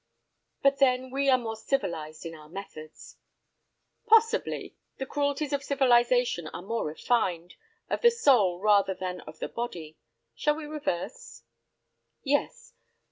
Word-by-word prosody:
"But 275 0 +3
then 255 -1 +2
we 275 +1 +1
are 260 - +6
more 225 -3 -5
civilized 170 - -3
in 165 - -6
our 155 -1 -13
methods." 155 -4 -10 0.9
"Possibly. 455 +2 +2 0.2
The 265 - -4
cruelties 285 +1 -1
of 280 - 0
civilization 245 - +2
are 175 - -8
more 225 0 -2
refined, 175 0 -1 0.3
of - - -2
the 475 - +7
soul 250 - +3
rather 200 -1 +3
than 180 0 -5
of 155 +1 -12
the - - -4
body. 170 -10 -6 0.3
Shall 300 0 +1
we 315 -1 -7
reverse?" 310 - -5 0.8
"Yes. 290 - -1
245 Hz, 135 wpm, -28 LUFS, 180-285 Hz, 0.9 s, the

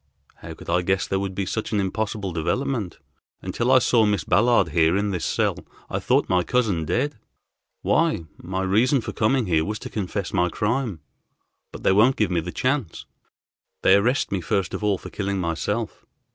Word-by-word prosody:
"How 80 0 -9
could - - -13
I 90 +1 +2
guess 95 +2 0
there 95 - -1
would 95 -1 -4
be 100 - -1
such 110 +4 -3
an 105 - +1
impossible 100 -1 -2
development? 105 - -2 0.5
Until 120 +2 -1
I 130 - +7
saw 120 -2 +3
Miss 105 -4 +1
Ballard 115 +6 +3
here 80 +2 +3
in 100 0 0
this 90 -3 -3
cell - - 0 0.3
I - - -1
thought - - +2
my 90 -1 +2
cousin 100 -6 0
dead. 125 - -1 0.6
Why, 160 - +1 0.2
my 95 +1 -3
reason 115 +8 +3
for - - -6
coming 120 +3 +1
here 80 -4 +2
was 105 +5 -3
to - - -9
confess 100 -2 -3
my 90 -1 +2
crime, 110 - -2 0.7
but - - -10
they - - +4
won't 115 +7 +5
give 105 -4 0
me 90 - +1
the 85 +2 -5
chance. 130 - -2 0.8
They - - +6
arrest 120 +7 +2
me 95 -2 -1
first 95 +1 -1
of - - -4
all 105 -2 +2
for - - -10
killing 100 -1 -2
myself. 95 +6 -2
100 Hz, 190 wpm, -23 LUFS, 90-115 Hz, 0.8 s, I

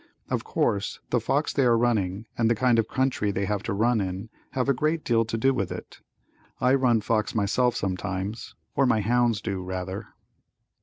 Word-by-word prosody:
Of - - 0
course 100 -1 -1
the 120 - +3
fox 140 +7 0
they 140 - +2
are 120 -2 +4
running 110 -4 0
and 115 -2 +2
the 115 - +3
kind 120 0 +3
of 110 - +1
country 130 -5 0
they 100 0 -1
have 105 -1 -1
to - - -4
run 115 +2 +2
in, 95 +3 -4 0.2
have 130 -1 0
a 140 - +4
great 155 +4 0
deal 115 -2 +3
to 115 +1 -3
do 135 +4 +3
with 100 -8 -2
it. - - -8 0.6
I 125 +1 +3
run 125 -4 +3
fox 110 +1 0
myself 115 +4 +2
sometimes, 95 +3 -3 0.2
or 135 - +3
my 110 -3 +3
hounds 120 0 +2
do 100 -4 -3
rather. 95 +3 -5
115 Hz, 195 wpm, -26 LUFS, 100-125 Hz, 0.6 s, are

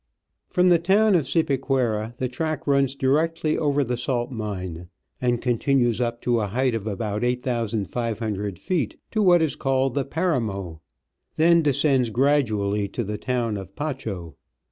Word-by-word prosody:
From 180 0 +3
the 175 -1 +5
town 200 +5 +3
of 160 -7 +2
Cipaquira 130 -7 0
the 130 - -1
track 155 +5 -3
runs 140 -1 +2
directly 155 +4 +1
over 145 -2 +1
the 125 -1 -2
salt 120 0 -2
mine, 95 -7 -5 0.3
arid 120 -2 +1
continues 120 -1 +1
up 120 -1 -2
to 120 -1 +2
a 105 - -1
height 125 +5 0
of 110 -2 -3
about 105 +1 -2
8, 125 +1 0 0.2
soo 105 -1 -1 0.7
feet 150 - -2
to 215 - +1
what 175 -4 +5
is 150 -4 0
called 135 -1 0
the 140 - 0
Paramo, 110 - -2 0.5
then 170 +1 +5
descends 140 -4 +2
gradually 110 -6 +1
to 120 +5 -4
the 105 0 -4
town 120 -4 -1
of 95 0 -9
Pacho. 110 - -5
125 Hz, 155 wpm, -24 LUFS, 110-145 Hz, 0.7 s, the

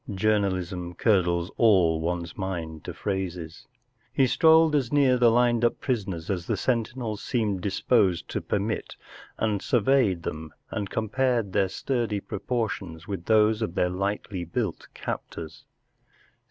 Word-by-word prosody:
Journalism 95 -3 0
curdles 90 -4 +2
all 90 -8 +4
one's 85 0 -3
mind 85 -6 -4
to - - -5
phrases. 90 0 -4 0.4
He 135 - +3
strolled 160 +3 +5
as 130 -5 0
near 140 -3 +4
ihe 125 - 0
lined 120 0 +3
up 120 - +2
prisoners 100 -10 -2
as 90 -3 -3
the - - 0
sentinels 115 -3 -2
seemed 105 -6 -1
disposed 95 -2 +1
to - - -2
permit 105 +2 -2 0.4
and 105 -3 0
surveyed 115 -7 +2
them 80 0 -6 0.2
and 100 -2 -3
com¬ 110 +1 -3
pared 120 -6 +1
their 100 -2 +2
sturdy 115 0 -1
propor¬ 120 +3 -2
tions 85 -2 -8
with 95 -4 -5
those 110 0 +3
of 90 -6 -2
their 90 - +1
lightly 100 0 -3
built 85 - -3
captors. 80 -1 -6
100 Hz, 140 wpm, -26 LUFS, 90-115 Hz, 0.4 s, strolled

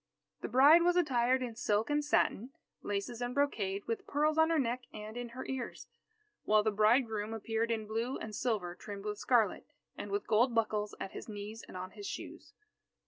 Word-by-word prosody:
The - - -3
bride 280 +8 +7
was 350 +1 +3
attired 260 -6 +2
in 240 -2 -4
silk 220 +2 0
and 295 0 +2
satin, 270 -3 +1 0.3
laces 205 +4 -3
and 245 0 -3
brocade, 205 -9 0
with 230 - -3
pearls 300 +2 +1
on 320 0 +5
her 330 - +2
neck 250 -2 -1
and 215 +1 -8
in 245 0 -5
her 255 +2 -7
ears. 260 -3 -5 0.6
While 215 0 +4
the 220 - +2
bridegroom 215 0 +2
appeared 225 +1 -1
in 220 -2 -1
blue 230 +4 -2
and 215 -1 -6
silver 200 -8 -1
trimmed 200 +2 -8
with 210 0 -3
scarlet, 235 -4 +2 0.3
and - - -6
with 405 0 -2
gold 235 +3 +3
buckles 215 -2 0
at 195 - -5
his - - -8
knees 210 +1 -7
and - - -8
on 185 +1 -6
his 405 - -8
shoes. - - -8
230 Hz, 195 wpm, -33 LUFS, 210-260 Hz, 0.6 s, bride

